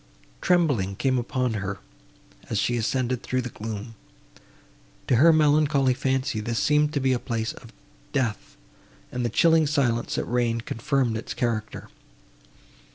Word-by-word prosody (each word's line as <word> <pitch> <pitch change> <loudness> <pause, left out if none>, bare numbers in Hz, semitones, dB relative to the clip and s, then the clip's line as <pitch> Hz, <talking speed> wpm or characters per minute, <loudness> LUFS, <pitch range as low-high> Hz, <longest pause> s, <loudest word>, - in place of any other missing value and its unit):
Trembling 140 - +2
came 130 +3 +1
upon 125 0 -1
her, 100 -2 -3 0.7
as 110 - -1
she 120 +4 +1
ascended 125 +1 -1
through 130 0 -2
the 125 - -5
gloom. 110 +1 -6 1.1
To 125 - +2
her 165 +7 +7
melancholy 150 -3 +3
fancy 130 -2 -1
this 115 +2 -3
seemed 150 +2 +2
to 145 - 0
be 130 -1 +2
a 125 - 0
place 115 -1 -3
of 115 - -14 0.4
death, 130 -7 -2 0.5
and 125 0 -3
the 120 - 0
chilling 160 +5 +4
silence, 125 -6 0
that - - -1
reigned, 115 -1 -1
confirmed 120 -1 0
its 110 - -6
character. 110 -3 -3
125 Hz, 145 wpm, -25 LUFS, 115-140 Hz, 1.1 s, her